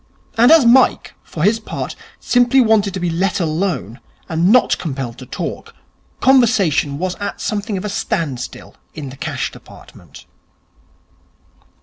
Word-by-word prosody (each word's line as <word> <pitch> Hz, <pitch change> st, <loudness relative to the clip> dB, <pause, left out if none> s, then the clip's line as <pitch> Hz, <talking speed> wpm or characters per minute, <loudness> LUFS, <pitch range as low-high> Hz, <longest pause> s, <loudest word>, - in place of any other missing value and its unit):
And 235 Hz, +4 st, +5 dB
as 320 Hz, -6 st, +7 dB
Mike, 250 Hz, +2 st, +4 dB
for 155 Hz, -, -5 dB
his 215 Hz, +4 st, +3 dB
part, 220 Hz, -, -6 dB, 0.2 s
simply 245 Hz, +2 st, +3 dB
wanted 215 Hz, -5 st, +2 dB
to -, -, -3 dB
be 175 Hz, -1 st, -1 dB
let 180 Hz, +4 st, 0 dB
alone, 160 Hz, -, -2 dB, 0.3 s
and 170 Hz, +3 st, +1 dB
not 250 Hz, +1 st, +3 dB
compelled 135 Hz, -7 st, -5 dB
to 130 Hz, -, -10 dB
talk, -, -, -6 dB, 0.5 s
conversation 215 Hz, -, +3 dB
was 180 Hz, +3 st, -2 dB
at 205 Hz, 0 st, -5 dB
something 210 Hz, -1 st, -3 dB
of 185 Hz, -, -5 dB
a -, -, -2 dB
standstill 185 Hz, -, -4 dB, 0.2 s
in 145 Hz, -3 st, -6 dB
the -, -, -10 dB
Cash 140 Hz, -, -4 dB
Department. -, -, -15 dB
195 Hz, 140 wpm, -18 LUFS, 160-225 Hz, 0.5 s, as